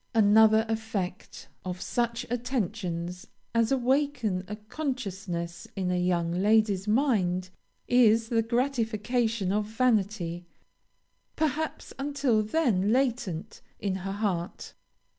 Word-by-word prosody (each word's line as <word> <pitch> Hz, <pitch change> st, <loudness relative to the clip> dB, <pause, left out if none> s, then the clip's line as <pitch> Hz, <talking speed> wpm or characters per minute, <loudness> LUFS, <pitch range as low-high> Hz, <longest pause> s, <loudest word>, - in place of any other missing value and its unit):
"Another 220 Hz, +1 st, +6 dB
effect 220 Hz, -5 st, -4 dB, 0.2 s
of 180 Hz, -1 st, -4 dB
such 235 Hz, +3 st, -1 dB
attentions 195 Hz, -8 st, -3 dB, 0.3 s
as 230 Hz, 0 st, +2 dB
awaken 255 Hz, -6 st, +1 dB
a 210 Hz, -, -4 dB
consciousness 200 Hz, -, -4 dB
in 185 Hz, -2 st, -1 dB
a -, -, +1 dB
young 175 Hz, -1 st, +1 dB
lady's 205 Hz, +1 st, +2 dB
mind, 195 Hz, -7 st, +1 dB, 0.4 s
is 230 Hz, -2 st, +4 dB
the 230 Hz, -1 st, +3 dB
gratification 230 Hz, -3 st, 0 dB
of 210 Hz, +1 st, +1 dB
vanity, 205 Hz, -7 st, 0 dB, 0.9 s
perhaps 315 Hz, 0 st, -2 dB
until 275 Hz, -5 st, +1 dB
then 215 Hz, -, +1 dB
latent 225 Hz, -7 st, -1 dB, 0.2 s
in 190 Hz, -2 st, -1 dB
her 195 Hz, +1 st, -4 dB
heart. 190 Hz, -4 st, -3 dB
215 Hz, 105 wpm, -28 LUFS, 185-240 Hz, 0.9 s, Another